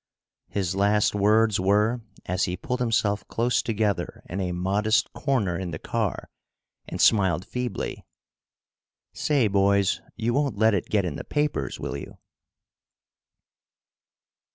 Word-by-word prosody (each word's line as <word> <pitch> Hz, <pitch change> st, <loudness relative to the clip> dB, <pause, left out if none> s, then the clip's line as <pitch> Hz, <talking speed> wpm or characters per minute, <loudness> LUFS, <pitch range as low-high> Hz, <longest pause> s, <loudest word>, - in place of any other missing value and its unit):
His 95 Hz, -3 st, -1 dB
last 105 Hz, +2 st, +3 dB
words 105 Hz, +1 st, +3 dB
were, 105 Hz, +5 st, +2 dB, 0.2 s
as 90 Hz, +2 st, 0 dB
he 90 Hz, -1 st, -3 dB
pulled 125 Hz, +7 st, -3 dB
himself 110 Hz, -4 st, +1 dB
close 115 Hz, 0 st, +1 dB
together 105 Hz, -3 st, -1 dB
in 95 Hz, +3 st, -3 dB
a 90 Hz, -1 st, -1 dB
modest 105 Hz, +5 st, +1 dB
corner 120 Hz, -8 st, 0 dB
in 95 Hz, 0 st, -3 dB
the -, -, -5 dB
car -, -, -2 dB, 0.6 s
and -, -, -6 dB
smiled 95 Hz, -5 st, +3 dB
feebly: 125 Hz, -5 st, -4 dB, 1.1 s
"Say, 140 Hz, -7 st, +2 dB
boys, 100 Hz, 0 st, +2 dB
you 120 Hz, +1 st, -1 dB
won't 140 Hz, -5 st, 0 dB
let 110 Hz, +1 st, +4 dB
it 95 Hz, -, -1 dB
get 100 Hz, -3 st, +2 dB
in 80 Hz, -5 st, -3 dB
the -, -, -6 dB
papers, 150 Hz, 0 st, -1 dB
will -, -, -4 dB
you?" -, -, -10 dB
105 Hz, 130 wpm, -25 LUFS, 95-115 Hz, 1.1 s, let